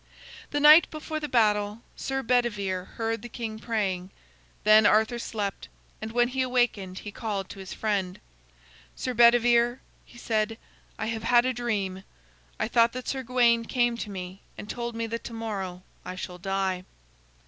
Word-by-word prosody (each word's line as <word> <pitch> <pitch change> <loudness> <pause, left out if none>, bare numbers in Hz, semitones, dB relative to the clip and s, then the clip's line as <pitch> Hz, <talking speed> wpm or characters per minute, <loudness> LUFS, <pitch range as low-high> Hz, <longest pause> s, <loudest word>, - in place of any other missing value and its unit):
The 290 - -1
night 305 +3 +8
before 310 0 -5
the 300 -1 -5
battle, 210 -2 +2
Sir 270 0 -3
Bedivere 210 -7 0
heard 225 0 -2
the 240 - -8
king 220 -2 -5
praying. 195 -5 -2 0.5
Then 215 0 +7
Arthur 220 +3 +3
slept, 205 -4 -4 0.3
and 220 0 -5
when 240 +1 +2
he 260 +1 -1
awakened 240 -7 0
he 205 - -7
called 205 -3 -4
to 195 - -9
his 190 -1 -8
friend: 195 -4 -2 0.8
"Sir 255 - -3
Bedivere," 240 +1 +5 0.3
he 240 - -17
said, 225 -1 -1 0.4
"I - - -3
have 225 0 -3
had 240 +2 +4
a 255 - +1
dream. 200 -6 -2 0.6
I - - 0
thought 230 0 +3
that 255 0 -6
Sir 265 - -2
Gawain 240 -2 +3
came 240 -1 +1
to 220 - -5
me 185 -1 -7 0.2
and - - -8
told 235 +1 -4
me 230 0 -2
that 230 +1 -5
to 235 - -6
morrow 195 -5 -5 0.2
I 185 - -6
shall 180 -1 -7
die." 190 -1 -1
225 Hz, 170 wpm, -27 LUFS, 200-240 Hz, 0.8 s, night